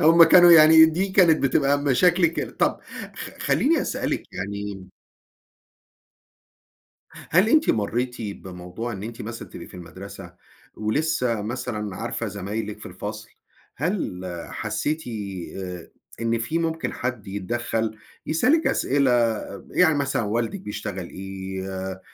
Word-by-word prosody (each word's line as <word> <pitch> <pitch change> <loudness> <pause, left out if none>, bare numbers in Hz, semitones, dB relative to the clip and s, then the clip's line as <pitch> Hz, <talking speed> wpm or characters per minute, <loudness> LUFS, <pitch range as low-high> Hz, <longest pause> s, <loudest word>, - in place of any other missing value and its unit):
هُم 165 +2 +8
كانوا 175 +1 +8
يعني 160 0 +9
دي 175 +5 0
كانت 180 -6 +4
بتبقى 140 +1 +3
مشاكلِك 165 +5 +3
ال - - -6
طَب - - +1 0.3
خ - - -7
خلّيني - - +2
أسألِك - - -2
يعني 100 -1 -5 2.2
هل 185 +7 +1
أنتِ 310 +2 +4
مرّيتِ 120 +4 0
بموضوع 95 +2 -6
إن 100 0 -7
أنتِ 115 +1 -7
مثلًا 115 +2 -7
تبقي - - -9
في - - -17
المدرسة، 90 -2 -10 0.4
ولسّه 125 0 0
مثلًا 105 -3 -4
عارفة 115 +1 -3
زمايلِك 105 +2 -4
في - - -11
الفصل، - - -7 0.5
هل 155 - -2 0.3
حسّيتِ 125 +9 -2 0.5
آآ 90 -3 -7 0.3
إن 115 0 +1
في 140 +9 -1
ممكن 165 0 -2
حد 120 -5 -4
يتدخّل، 110 +2 -2 0.3
يسألِك 255 - +3
أسئلة 140 -1 +2 0.5
ب - - -16
يعني 160 -4 +4
مثلًا 140 -3 0
والدِك 115 - -1
بيشتغل 100 -3 -5
إيه؟ 95 0 -6
آآ 95 0 -5
115 Hz, 125 wpm, -24 LUFS, 100-160 Hz, 2.2 s, يعني